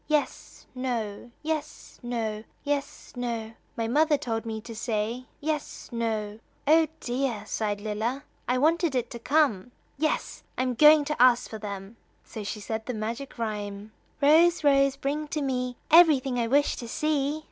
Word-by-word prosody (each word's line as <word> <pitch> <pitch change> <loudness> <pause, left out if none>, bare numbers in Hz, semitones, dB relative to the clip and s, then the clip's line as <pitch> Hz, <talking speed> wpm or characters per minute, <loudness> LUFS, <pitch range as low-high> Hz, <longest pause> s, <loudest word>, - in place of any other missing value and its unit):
"Yes; 300 -2 -2
no; 240 -4 -3
yes; 310 -1 -4
no; 225 -3 -3 0.2
yes; 285 -1 -3
no; 230 -2 -3 0.2
My 230 -1 -1
mother 300 +5 +3
told 225 -3 -3
me 220 -1 -3
to 230 +1 -9
say 225 +2 -2
Yes; 305 0 -4
no." 220 -3 -2 0.3
"Oh, 315 +2 +5
dear," 245 -4 -2
sighed 205 -2 -2
Lilla, 220 +6 -2 0.2
"I 250 +1 +2
wanted 320 +1 +2
it 245 -1 -1
to 235 - -6
come, 250 -6 +2 0.3
'yes' 310 0 -1 0.2
I - - +1
am 255 -1 0
going 300 +3 +7
to 300 -4 -1
ask 250 -1 +5
for 220 - -7
them!" 200 +1 -7 0.3
So 215 - -7
she 210 +1 -4
said 220 +1 -4
the 250 - -2
magic 230 +6 -5
rhyme: 210 -2 -4 0.3
"Rose, 325 +3 +5
Rose, 275 -1 +4
bring 290 +2 -2
to 300 +1 -2
me 250 -2 -2
Everything 285 -7 +6
I 230 - +1
wish 285 +4 +2
to 235 - -6
see." 295 +3 0
250 Hz, 160 wpm, -27 LUFS, 220-290 Hz, 0.3 s, going